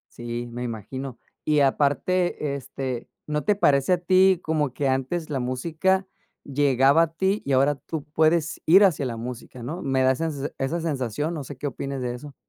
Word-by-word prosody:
Sí, 120 0 -5
me 120 +1 -5
imagino. 120 +3 -6 0.2
Y 150 -1 +2
aparte 145 +2 +1
este, 130 -2 -5 0.2
¿no 150 0 -1
te 210 - +2
parece 140 -5 +3
a 180 - +5
ti 185 +1 +4
como 155 -3 0
que 140 +1 -1
antes 135 +6 -1
la 135 -3 -1
música 165 +10 0 0.4
llegaba 140 +1 +4
a 165 -1 +1
ti 190 +5 0
y 140 - -2
ahora 135 +2 +3
tú 150 +1 -6
puedes 160 +1 +2
ir 190 +5 +7
hacia 155 -7 +1
la 120 -2 -3
música, 125 +1 -7
no? 155 +10 -5
Me 135 -3 +1
da 130 - +5
esa 160 +5 -1
sen 145 -1 -4
esa 145 +6 -1
sensación, 145 -1 -2
¿no 155 -4 -4
sé 135 0 -9
qué 145 - -3
opines 135 0 -4
de 125 -1 -2
eso? 135 +3 -10
140 Hz, 190 wpm, -25 LUFS, 130-165 Hz, 0.4 s, ir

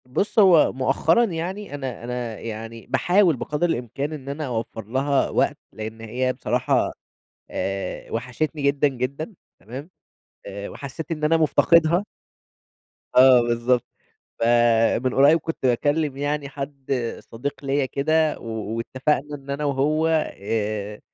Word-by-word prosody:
بُص 195 - 0
هو 185 -6 +6
مؤخرا 135 - +2
يعني 185 -1 -4
أنا 130 -4 -5
أنا 120 -2 -4
يعني، 115 0 -7
باحاول 180 -3 +3
بقدر 150 +7 -1
الإمكان 135 +3 -3
إن 140 -3 -7
أنا 150 +2 -3
أوفّر 115 -3 -4
لها 135 +5 +1
وقت، - - +1 0.2
لإن 110 +1 -7
هي 125 +3 -1
بصراحة، - - 0 0.6
آآ 95 0 -4
وحشتني 130 +6 -2
جدًا، 140 +1 +3
جدًا، 140 - -4 0.3
تمام؟ 130 - -9 0.6
آآ 100 0 -6
وحسّيت 140 +4 -7
إن 155 -2 -3
أنا 160 +2 +4
مُفتقدها 170 +3 +4 1.1
آه، 130 -1 +8
بالضبط 120 +1 +1 0.6
فمن 120 +1 +3
قريّب 145 +4 +6
كنت 165 +1 -4
باكلّم 145 +3 +1
يعني 145 0 -2
حد 140 -1 -6 0.4
صديق 140 +5 -5
ليّا 135 0 +1
كده، 155 +4 +1
و - - -11 0.3
واتفقنا 135 +5 -1
إن 140 0 -11
أنا 140 +2 -2
وهو 145 +3 +1 0.3
آآ 105 0 -3
135 Hz, 130 wpm, -23 LUFS, 120-150 Hz, 1.1 s, آه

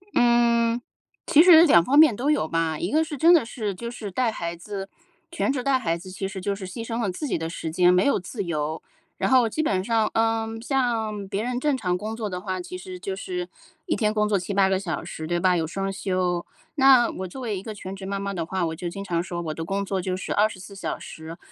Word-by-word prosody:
嗯。 235 0 +3 0.5
其 305 - +7
实 340 -2 +9
2 170 - +6
方 280 - +2
面 305 -6 +8
都 270 +6 -1
有 300 - +2
吧， 165 -1 0
一 175 +6 -3
个 315 +1 +3
是 305 -2 -6
真 335 +6 +6
的 310 -9 +4
是 215 -5 -4
就 235 +5 -6
是 215 -5 -7
带 240 +2 +1
孩 170 -4 -4
子 195 +2 -7 0.4
全 335 - -1
职 255 -3 -2
带 270 -2 +2
孩 165 -6 -1
子 185 +2 -11
其 195 +1 -4
实 190 -1 -7
就 200 +1 -1
是 190 -2 -7
牺 225 +5 -6
牲 230 0 -3
了 200 - 0
自 185 +11 -4
己 - - 0
的 160 0 -4
时 160 -1 -5
间， 180 +1 +4
没 180 +2 +4
有 280 - +3
自 200 +3 -5
由。 155 -2 -3 0.4
然 - - 0
后 255 -3 +5
基 310 +8 -2
本 190 -8 0
上， 225 -2 +2
嗯， 225 0 0
像 225 -6 -1
别 205 +3 -2
人 245 0 -2
正 290 -1 +1
常 180 -5 -1
工 215 +4 -5
作 215 -2 -3
的 180 0 -5
话， 185 -2 -3
其 180 +1 -7
实 180 0 -9
就 190 +1 -4
是 355 - -4 0.4
一 345 - 0
天 215 -2 +1
工 210 -1 +1
作 205 -2 +2
7、8 195 +1 +1
个 190 -1 +1
小 170 -6 -4
时， 160 0 -6
对 175 0 0
吧？ 180 0 +3
有 165 -1 0
双 195 +3 -3
休。 185 -3 -1 0.3
那 265 -4 +6
我 190 0 -5
作 260 - -9
为 215 -5 -2
一 - - -6
个 220 - -6
全 190 0 -7
职 190 0 -8
妈 195 0 -3
妈 200 0 -3
的 165 -3 -3
话， 185 0 -1
我 160 - -3
就 175 +1 -4
经 195 +3 -6
常 170 -3 -1
说 175 -2 -5
我 155 - -3
的 165 - -5
工 195 +3 -2
作 190 -1 -2
就 185 0 -2
是 - - -4
24 205 -2 -1
小 195 - -4
时， 160 +1 -9
200 Hz, 270 characters per minute, -24 LUFS, 180-235 Hz, 0.5 s, 实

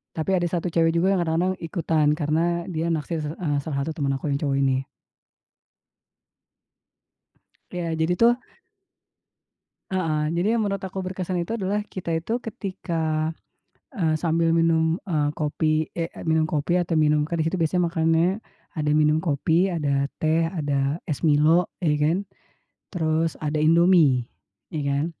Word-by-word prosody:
Tapi 165 +4 0
ada 175 -2 +1
1 175 0 -2
cewek 165 -1 +2
juga 175 +4 +2
yang 185 - +1
kadang-kadang 170 +3 0
ikutan, 165 -3 0
karena 155 +2 +1 0.2
dia 170 -2 -2
naksir 160 0 -2
s - - -4
eee, 155 -3 -2
salah 140 -1 -3
satu 160 - -3
temen 140 -4 -1
aku 135 +2 -2
yang 140 0 -1
cowok 140 -2 +1
ini. 135 -1 +1 2.9
Iya, 175 -1 -3
jadi 160 +2 +2
tuh 230 +1 +7 1.6
heeh, 155 -5 0
jadi 175 +7 +1
yang 230 - +1
menurut 200 -2 -2
aku 190 0 -5
berkesan 185 -1 -3
itu 225 +7 -3
adalah 205 +1 -1
kita 185 -5 -5
itu 195 +9 -1
ketika, 165 -7 -3 0.6
eee, 160 -4 +1
sambil 165 +1 +1
minum, 165 0 +2
eee, 150 -3 +1
kopi, 155 +1 0
eh 165 - 0
eee, - - -10
minum 160 0 +3
kopi 155 +3 0
atau 175 -1 -1
minum, 150 -1 +3
kan 165 +1 -2
di - - +1
situ 185 - -2
biasanya 170 +1 +1
makannya 165 +1 +2 0.5
ada 150 -1 0
minum 150 0 +3
kopi, 160 +4 +1
ada 140 -4 0 0.2
teh, 160 +1 +2
ada 145 -1 -1
es 150 +1 -2
Milo 155 +3 +4 0.2
ya 160 -4 +2
kan, 155 +4 +2 0.7
terus 160 -2 0
ada 150 0 -1
Indomie, 160 -6 +4 0.4
ya 155 - -3
kan. 140 +2 +1
160 Hz, 155 wpm, -24 LUFS, 155-175 Hz, 2.9 s, tuh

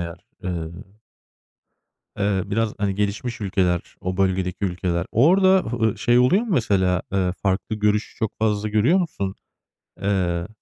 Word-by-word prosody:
eğer, 85 0 -7 0.2
ııı, 90 +4 -6 1.5
biraz, 115 0 0
hani, 100 -2 -1
gelişmiş 105 +4 -2
ülkeler, 90 -3 0
o 90 0 -3
bölgedeki 95 0 0
ülkeler... 90 -1 -1
Orada, 185 - +5 0.2
ııı, 110 -3 0
şey 120 +1 +3
oluyor 165 - +4
mu 240 - -7
mesela? 95 - +2
Iıı, 90 -2 +1
farklı 95 +2 0
görüş 105 0 0
çok 110 -2 -2
fazla 105 -1 0
görüyor 120 - +3
musun? 100 - -3 0.7
Iıı 90 -3 0
100 Hz, 130 wpm, -23 LUFS, 90-110 Hz, 1.5 s, Orada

